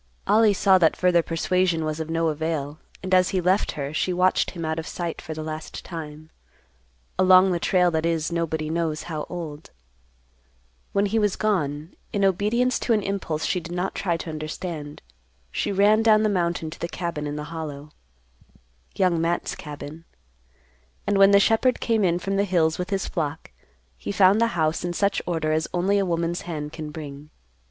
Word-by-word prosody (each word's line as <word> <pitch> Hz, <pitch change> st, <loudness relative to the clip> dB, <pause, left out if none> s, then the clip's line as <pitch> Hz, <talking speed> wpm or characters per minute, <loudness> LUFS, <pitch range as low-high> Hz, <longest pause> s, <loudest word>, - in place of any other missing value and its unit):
Ollie 215 Hz, 0 st, +5 dB
saw 190 Hz, 0 st, +5 dB
that 165 Hz, -3 st, +4 dB
further 180 Hz, -1 st, +4 dB
persuasion 165 Hz, 0 st, 0 dB
was 155 Hz, 0 st, -3 dB
of 160 Hz, 0 st, -4 dB
no 165 Hz, 0 st, +1 dB
avail, 155 Hz, -1 st, -3 dB, 0.2 s
and 185 Hz, 0 st, -2 dB
as 185 Hz, 0 st, +5 dB
he 190 Hz, -, 0 dB
left 185 Hz, +3 st, +1 dB
her, 140 Hz, 0 st, -4 dB
she 180 Hz, -, 0 dB
watched 180 Hz, +1 st, +2 dB
him 170 Hz, -2 st, -6 dB
out 160 Hz, +1 st, -1 dB
of 160 Hz, -, -6 dB
sight 170 Hz, -2 st, -4 dB
for 160 Hz, -2 st, -7 dB
the 155 Hz, -, -5 dB
last 155 Hz, 0 st, -7 dB
time—along 150 Hz, -, -1 dB
the 175 Hz, -, 0 dB
trail 180 Hz, 0 st, +3 dB
that 160 Hz, -1 st, 0 dB
is 165 Hz, -1 st, 0 dB
nobody 160 Hz, -2 st, -1 dB
knows 160 Hz, -2 st, -1 dB
how 155 Hz, -3 st, -5 dB
old. 160 Hz, -4 st, -7 dB, 1.2 s
When 200 Hz, +1 st, +2 dB
he 220 Hz, +3 st, +1 dB
was 210 Hz, -2 st, +1 dB
gone, 155 Hz, -7 st, -1 dB, 0.2 s
in 200 Hz, -1 st, +1 dB
obedience 210 Hz, +7 st, +1 dB
to 235 Hz, -, +1 dB
an 210 Hz, -2 st, +1 dB
impulse 175 Hz, -6 st, -2 dB
she 180 Hz, -, 0 dB
did 170 Hz, +1 st, -7 dB
not 180 Hz, +2 st, -2 dB
try 175 Hz, -4 st, -1 dB
to 165 Hz, -, -6 dB
understand, 155 Hz, -1 st, -6 dB, 0.5 s
she 205 Hz, -, -1 dB
ran 205 Hz, +3 st, +4 dB
down 215 Hz, -1 st, +5 dB
the 215 Hz, -, +3 dB
mountain 170 Hz, -4 st, -1 dB
to -, -, -10 dB
the 170 Hz, -, -2 dB
cabin 170 Hz, -5 st, -4 dB
in 145 Hz, -, -4 dB
the 150 Hz, +1 st, -6 dB
Hollow—Young 65 Hz, -, -5 dB
Matt's 170 Hz, +1 st, -1 dB
cabin. 150 Hz, +2 st, -9 dB, 1.0 s
And 205 Hz, -1 st, +1 dB
when 195 Hz, 0 st, +8 dB
the 200 Hz, 0 st, +6 dB
shepherd 225 Hz, +5 st, +3 dB
came 225 Hz, -3 st, +1 dB
in 175 Hz, -2 st, +2 dB
from 195 Hz, +2 st, -2 dB
the 200 Hz, -, +2 dB
hills 165 Hz, -4 st, +1 dB
with 180 Hz, 0 st, -3 dB
his 195 Hz, -2 st, -1 dB
flock 150 Hz, -, -4 dB, 0.5 s
he -, -, -4 dB
found 195 Hz, +2 st, +5 dB
the 230 Hz, -, +4 dB
house 160 Hz, +1 st, +1 dB
in 175 Hz, 0 st, -2 dB
such 200 Hz, +3 st, +1 dB
order 160 Hz, -3 st, 0 dB
as 155 Hz, 0 st, 0 dB
only 195 Hz, +3 st, +2 dB
a 195 Hz, -, 0 dB
woman's 170 Hz, 0 st, -1 dB
hand 150 Hz, -3 st, -5 dB
can 155 Hz, -2 st, -6 dB
bring. 150 Hz, -1 st, -9 dB
170 Hz, 185 wpm, -24 LUFS, 155-190 Hz, 1.2 s, when